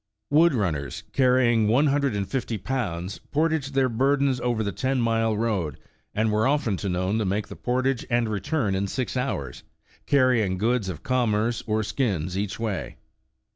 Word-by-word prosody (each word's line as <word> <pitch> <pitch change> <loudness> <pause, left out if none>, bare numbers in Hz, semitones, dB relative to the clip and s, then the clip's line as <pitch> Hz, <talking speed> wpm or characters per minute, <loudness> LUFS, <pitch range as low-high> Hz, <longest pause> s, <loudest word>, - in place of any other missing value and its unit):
Wood 160 0 +5
runners, 80 - -2
carrying 125 -4 +3
one 125 +8 +4
hundred 140 -4 +1
and 100 -1 -2
fifty 115 +1 -2
pounds, 95 -5 -3
por 155 +3 +2
taged 145 -3 -2
their 135 -1 +4
burdens 135 +2 +1
over 120 -2 0
the 100 - -2
ten 130 +8 -1
mile 115 -2 +1
road, 95 -10 -1 0.4
and 110 +1 +1
were 110 +2 +2
often 130 -9 +1
known 95 +4 0
to - - +1
make 100 +2 -1
the - - -8
portage 130 0 0
and 120 -1 +2
return 105 +2 -1
in 95 +1 0
six 130 +5 -3
hours, 100 - -3 0.5
carrjdng 125 -9 +3
goods 110 0 0
of 85 -5 -7
commerce 120 -2 +1
or 110 0 +1
skins 100 - -1
each 100 +2 -3
way. 110 -6 -3
115 Hz, 170 wpm, -25 LUFS, 100-130 Hz, 0.5 s, Wood